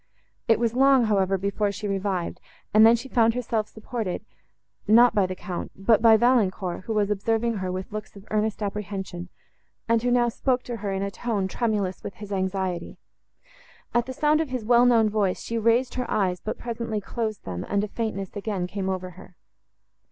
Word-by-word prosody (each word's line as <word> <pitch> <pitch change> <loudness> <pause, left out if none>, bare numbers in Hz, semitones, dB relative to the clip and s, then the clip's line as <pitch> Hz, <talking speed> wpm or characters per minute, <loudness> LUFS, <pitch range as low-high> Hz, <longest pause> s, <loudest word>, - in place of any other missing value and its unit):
It 225 - +5
was 235 -1 +1
long, 270 0 +5
however, 195 -2 +2
before 200 +2 -1
she 205 +1 -5
revived, 195 -3 -2 0.3
and 215 +1 +7
then 230 - +6
she 240 +3 -6
found 230 -3 +3
herself 225 -3 -1
supported—not 225 +1 0
by 200 -3 +2
the 185 - -5
Count, 180 -1 -6
but 210 +3 +3
by 225 -1 +7
Valancourt, 205 -7 +1
who 225 - -2
was 210 -1 +1
observing 225 +3 0
her 185 -1 -3
with 185 +2 -5
looks 215 0 -7
of 200 0 -13
earnest 215 0 0
apprehension, 195 -3 -5 0.6
and 230 -1 +3
who 245 - 0
now 245 -1 +3
spoke 250 +1 0
to 240 -1 -5
her 200 -2 -3
in 195 0 -2
a 200 - -3
tone, 205 -4 -2
tremulous 205 -3 -1
with 200 - -6
his 210 -1 -10
anxiety. 190 -2 -2 1.0
At 240 0 +1
the 260 - -4
sound 305 +3 +2
of 315 - -3
his 255 -4 -4
well 240 +1 +5
known 230 -3 +5
voice, 205 -3 0
she 230 0 -2
raised 230 +3 +2
her 250 -1 -3
eyes, 185 -4 0
but 215 - -5
presently 230 -2 -3
closed 215 +1 -4
them, 90 -1 -4
and 200 0 +1
a - - -2
faintness 205 -3 -4
again 200 -3 -2
came 190 +1 -3
over 185 -1 -3
her. 180 0 -15
210 Hz, 190 wpm, -25 LUFS, 195-235 Hz, 1.0 s, and